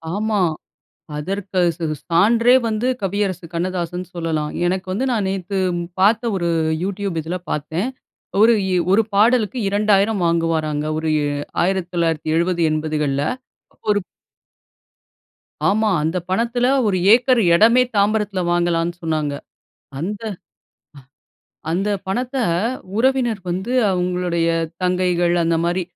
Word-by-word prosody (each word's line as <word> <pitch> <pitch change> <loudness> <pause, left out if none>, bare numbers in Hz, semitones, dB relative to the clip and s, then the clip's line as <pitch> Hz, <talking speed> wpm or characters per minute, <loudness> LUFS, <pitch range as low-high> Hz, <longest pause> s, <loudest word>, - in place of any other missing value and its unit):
ஆமா. 215 -1 0 0.8
அதற்கு 190 +4 -2
ஸ் - - -29
ஸ் 150 - -11
சான்றே 230 +8 +4
வந்து 220 +3 -1
கவியரசு 195 -2 -2
கண்ணதாசன்னு 180 0 -3
சொல்லலாம். 160 -3 -2
எனக்கு 185 +1 -1
வந்து, 220 +8 -1
நான் 220 -5 0
நேத்து 195 0 -3 0.4
பார்த்த 225 +4 +3
ஒரு 175 -2 -1 0.3
YouTube 195 -2 -3
இதுல 170 +4 -4
பார்த்தேன். 160 - -2 0.5
ஒரு 230 +2 +7
இ - - -2 0.2
1 205 +3 +5
பாடலுக்கு 225 +3 +3
2,000 205 0 +2
வாங்குவாராங்க. 160 -3 0
ஒரு 160 0 -2
இ - - -1 0.4
1970, 170 -2 0
80கள்ல. 150 -2 -1 0.7
1 205 0 +1 1.7
ஆமா, 215 +2 +2
அந்தப் 170 +2 -2
பணத்துல 235 +5 +1 0.2
1 190 - +1
ஏக்கர் 245 +1 +5
இடமே 230 +7 +5
தாம்பரத்துல 205 -1 +1
வாங்கலான்னு 175 0 0
சொன்னாங்க. 155 -3 -1 0.7
அந்த 200 +6 -4 1.2
அ 160 - -8
அந்த 195 +5 0 0.2
பணத்த, 250 +7 -2 0.6
உறவினர் 245 -3 +1
வந்து 185 +6 -3 0.2
அவங்களுடைய 180 -2 0 0.3
தங்கைகள் 180 -1 +1
அந்த 165 0 +1
மாரி, 175 +2 0
185 Hz, 110 wpm, -20 LUFS, 170-210 Hz, 1.7 s, ஒரு